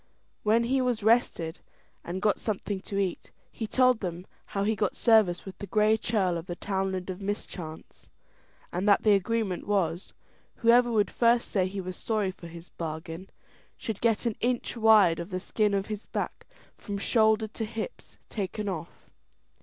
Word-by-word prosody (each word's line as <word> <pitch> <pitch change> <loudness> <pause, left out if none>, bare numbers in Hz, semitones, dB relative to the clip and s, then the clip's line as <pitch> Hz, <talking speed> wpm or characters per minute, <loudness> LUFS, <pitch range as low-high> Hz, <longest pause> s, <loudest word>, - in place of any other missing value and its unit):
When 220 +2 +3
he 260 +3 +1
was 245 -4 0
rested 205 -7 +2 0.4
and 180 +2 -5
got 210 - +2
something 205 -2 -3
to 200 - -5
eat, 190 -3 -2 0.2
he 220 - -5
told 255 0 +4
them 180 -2 -5 0.2
how 200 - -2
he 220 +2 +1
got 205 -1 -1
service 215 -7 +4
with 190 - -8
the 200 - -6
Gray 215 +3 +3
Churl 195 -6 0
of 165 - -10
the 175 - -4
Townland 190 -1 -2
of 185 +2 -8
Mischance, 185 -5 -6 0.6
and 185 +4 0
that 200 - +5
the 210 - +6
agreement 200 -2 0
was, 185 -3 0 0.4
whoever 240 +1 +4
would 210 -4 +2
first 235 0 +2
say 185 -2 +2
he 195 +1 -4
was 185 0 -6
sorry 215 -4 -1
for 175 -2 -12
his 170 +1 -11
bargain, 165 +3 -6 0.5
should 220 -3 -5
get 230 0 +2
an 230 -3 0
inch 245 0 -1
wide 215 -7 +5
of 170 - -5
the 185 -1 -3
skin 210 +2 0
of 195 0 0
his 215 -1 -6
back, - - -4 0.3
from 205 -2 -5
shoulder 220 +1 +3
to 220 +1 -4
hips, 225 - -7
taken 205 0 -4
off. 170 -3 -6
205 Hz, 175 wpm, -28 LUFS, 185-220 Hz, 0.6 s, the